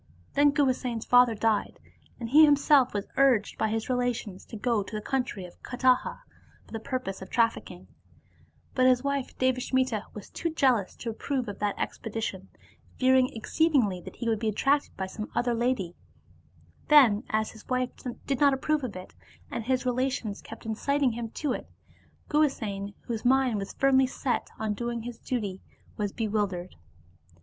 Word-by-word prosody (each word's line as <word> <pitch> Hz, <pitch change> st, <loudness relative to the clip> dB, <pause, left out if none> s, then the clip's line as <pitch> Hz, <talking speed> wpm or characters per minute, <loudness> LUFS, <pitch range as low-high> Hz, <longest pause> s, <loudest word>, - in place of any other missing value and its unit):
Then 290 Hz, +1 st, +5 dB
Guhasena's 255 Hz, -5 st, 0 dB
father 245 Hz, -2 st, +5 dB
died, 215 Hz, 0 st, 0 dB, 0.4 s
and 235 Hz, -, -4 dB
he 300 Hz, +5 st, +8 dB
himself 285 Hz, -3 st, +5 dB
was 205 Hz, 0 st, -3 dB
urged 260 Hz, -6 st, +3 dB
by -, -, +2 dB
his 220 Hz, 0 st, -2 dB
relations 245 Hz, -6 st, -2 dB
to 225 Hz, -, -8 dB
go 230 Hz, -1 st, +1 dB
to 200 Hz, -, -7 dB
the -, -, -1 dB
country 245 Hz, -5 st, -2 dB
of 175 Hz, -, -15 dB
Kataha 255 Hz, 0 st, +1 dB, 0.4 s
for -, -, -21 dB
the 225 Hz, -, -4 dB
purpose 240 Hz, -6 st, -4 dB
of 190 Hz, -, -8 dB
trafiicking; 230 Hz, -2 st, 0 dB, 0.9 s
but 255 Hz, -1 st, +4 dB
his 250 Hz, 0 st, +4 dB
wife 280 Hz, -2 st, -2 dB
Devasmita 255 Hz, -3 st, +1 dB
was 210 Hz, -, -9 dB
too 335 Hz, -, -2 dB
jealous 255 Hz, -, +2 dB
to 230 Hz, -, -5 dB
approve 255 Hz, +2 st, -3 dB
of 205 Hz, -, -6 dB
that 205 Hz, -1 st, -1 dB
expedi 225 Hz, 0 st, -4 dB
tion, 190 Hz, -3 st, -4 dB, 0.5 s
fearing 260 Hz, 0 st, +4 dB
exceedingly 230 Hz, -, +1 dB
that -, -, -10 dB
he 235 Hz, -, -4 dB
would 225 Hz, -2 st, +1 dB
be 220 Hz, -, 0 dB
attracted 275 Hz, +7 st, +1 dB
by 190 Hz, -, -2 dB
some 210 Hz, +3 st, -6 dB
other 245 Hz, 0 st, +1 dB
lady* 235 Hz, -7 st, 0 dB, 0.9 s
Then, 255 Hz, -9 st, +6 dB
as 215 Hz, 0 st, 0 dB
his 220 Hz, -, -16 dB
wife 255 Hz, -1 st, 0 dB, 0.3 s
did 275 Hz, -3 st, -1 dB
not 280 Hz, -2 st, +5 dB
approve 300 Hz, +2 st, 0 dB
of 240 Hz, -6 st, -4 dB
it, 185 Hz, 0 st, -9 dB, 0.4 s
and 230 Hz, -, -4 dB
his 255 Hz, +1 st, 0 dB
relations 250 Hz, -4 st, -1 dB
kept -, -, -11 dB
inciting 270 Hz, +5 st, +1 dB
him 230 Hz, 0 st, -5 dB
to 280 Hz, +3 st, -2 dB
it, -, -, -6 dB, 0.6 s
Guhasena, 215 Hz, -10 st, 0 dB
whose 225 Hz, -2 st, -4 dB
mind 255 Hz, -3 st, +3 dB
was 195 Hz, -, -6 dB
firmly 265 Hz, -1 st, +4 dB
set 255 Hz, 0 st, -2 dB
on 215 Hz, -1 st, -1 dB
doing 235 Hz, +1 st, -3 dB
his 240 Hz, -1 st, -7 dB
duty, 205 Hz, -7 st, -3 dB, 0.3 s
was 205 Hz, -2 st, -2 dB
bewildered. 205 Hz, -5 st, -2 dB
240 Hz, 170 wpm, -28 LUFS, 215-260 Hz, 0.9 s, he